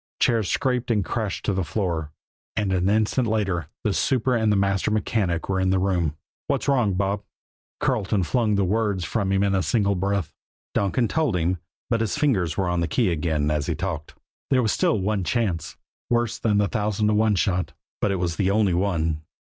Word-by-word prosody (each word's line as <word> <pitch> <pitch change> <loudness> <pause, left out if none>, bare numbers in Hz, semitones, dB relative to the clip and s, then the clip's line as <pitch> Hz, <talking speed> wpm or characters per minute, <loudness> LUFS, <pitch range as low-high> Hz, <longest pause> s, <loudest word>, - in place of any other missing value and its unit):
Chairs 115 -5 +2
scraped 125 -3 0
and 105 -4 +1
crashed 110 -5 -3
to 100 - +1
the 95 0 0
floor, 80 -3 -2 0.4
and 100 -2 0
an 95 +1 +2
instant 110 +4 +2
later 95 -8 0 0.2
the 105 - +1
super 130 +2 +1
and 110 -2 +2
the - - +3
master 100 0 +1
mechanic 105 -5 0
were 95 -1 0
in 95 0 +2
the 95 - +3
room. 90 -5 0 0.3
"What's - - -1
wrong, 120 -9 +2
Bob?" 100 +1 0 0.6
Carleton 100 -2 +1
flung 110 +3 +1
the 100 -1 +2
words 100 -2 0
from 100 -4 -1
him 95 0 +2
in 100 -1 +2
a 95 - +2
single 100 -1 +1
breath. 95 -3 -1 0.4
Donkin 105 +4 +1
told 155 -8 0
them. 90 +1 0 0.3
But 115 - +2
his 115 +5 -1
fingers 115 - +1
were 95 -2 +1
on 90 0 0
the 85 - 0
key 115 -4 +1
again 75 -2 0
as 75 -1 -1
he 85 - 0
talked. 80 -3 -4 0.3
There 130 -2 +3
was 110 - +2
still 110 - +2
one 100 0 0
chance, 95 -7 -1 0.3
worse 120 -2 0
than 105 -3 +2
the 105 -1 +3
thousand 105 -1 -1
to - - +2
one 105 0 +3
shot; 90 -1 0 0.3
but - - +2
it 100 - +1
was 85 -2 -2
the 95 -2 +2
only 100 -2 +2
one. 85 -4 0
100 Hz, 205 wpm, -24 LUFS, 90-110 Hz, 0.6 s, the